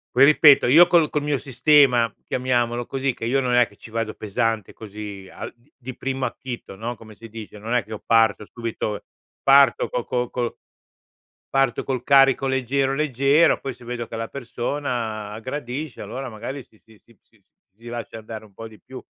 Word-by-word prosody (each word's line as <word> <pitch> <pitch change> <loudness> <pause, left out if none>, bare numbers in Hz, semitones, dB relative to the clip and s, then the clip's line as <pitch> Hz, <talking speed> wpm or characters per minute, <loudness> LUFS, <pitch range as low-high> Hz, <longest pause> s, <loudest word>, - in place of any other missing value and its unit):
poi, 130 - +6
ripeto, 145 -2 +6
io 165 +7 +8
col 170 -4 +4
col 150 -1 -2
mio 145 -2 0
sistema, 130 -3 +3
chiamiamolo 120 -2 0
così 135 -1 -1
che 115 - -6
io 135 +4 +1
non 125 -1 0
è 120 -1 +5
che 100 - -20
ci 115 - -13
vado 115 -1 -2
pesante 110 0 -2
così 105 -3 -9
al - - -8 0.2
di 130 0 -8
primo 135 -1 -2
acchito, 120 -6 -7
no, 120 +3 -4
come 110 -1 -14
si 115 - -12
dice. 110 -1 -10
Non 115 +3 -4
è 120 - +2
che - - -24
io 110 - -5
parto 115 -2 +3
subito 115 -3 -5 0.4
parto 140 0 +5
co 125 - -3
co 125 -1 -2
co 120 -2 -3 0.9
parto 135 -3 +1
col 130 -3 -2
carico 135 -1 +5
leggero, 135 +1 0
leggero, 145 +2 +3
poi, 135 -2 -5
se 120 - -16
vedo 120 -1 -5
che 115 - -6
la 115 0 -3
persona 120 -5 -4
gradisce, 130 +3 -5
allora, 130 +6 -6
magari, 120 +5 -7
si 110 - -27
si 110 -2 -20
si 115 - -24
si - - -31 0.4
si 115 - -21
lascia 120 -1 -6
andare 110 0 -9
un 105 - -19
po' 115 - -8
di 110 -1 -17
più, 130 -1 -10
120 Hz, 190 wpm, -23 LUFS, 115-135 Hz, 0.9 s, io